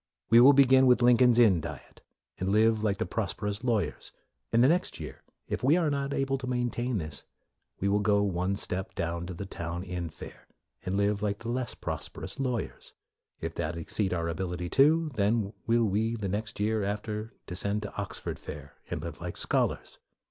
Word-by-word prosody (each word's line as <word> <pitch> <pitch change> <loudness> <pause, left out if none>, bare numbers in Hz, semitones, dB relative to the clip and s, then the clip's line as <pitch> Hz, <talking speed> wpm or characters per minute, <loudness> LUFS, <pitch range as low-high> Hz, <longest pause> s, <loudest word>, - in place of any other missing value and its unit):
We 115 - +9
will 135 +4 +9
begin 130 -1 +6
with 125 -1 +5
Lincoln's 125 0 +6
Inn 105 -9 +5
diet, - - -9 0.4
and 95 - -1
live 110 +1 +3
like 100 -2 +1
the - - -1
prosperous 105 +2 -3
lawyers; 115 -5 -1 0.4
and 115 +1 +4
the - - +7
next 175 +5 +1
year, - - -8 0.3
if - - -3
we 145 +6 +5
are 165 -4 +1
not 140 0 -1
able 135 -1 0
to 130 - -6
maintain 125 -1 -1
this, 75 -5 -4 0.6
we 100 - 0
will 100 +1 +3
go 100 0 +3
one 95 0 0
step 95 -1 -3
down 85 +1 -2
to 90 - -6
the 100 - -5
Town 85 -1 -5
Inn 90 -3 -4
fare, 75 - -11 0.4
and 95 +2 0
live 100 0 +1
like 100 -1 -1
the 115 - -7
less 125 0 -2
prosperous 80 - -6
MORE 130 -2 0
43 - - -5
lawyers. - - -16 0.5
If - - -3
that 80 +2 -3
exceed 95 +4 -1
our 85 -2 -1
ability 90 +1 -3
too, 155 - +4
then 105 -1 +1
will 115 0 +3
we 110 +3 0
the 105 -3 -3
next 105 +2 -4
year 110 +1 +1
after 105 +2 -4
descend 100 +3 -2
to 105 - -7
Oxford 100 -1 -5
fare, 70 -1 -9
and - - -4
live - - -7
like - - -5
scholars. - - -1
105 Hz, 195 wpm, -29 LUFS, 95-120 Hz, 0.6 s, We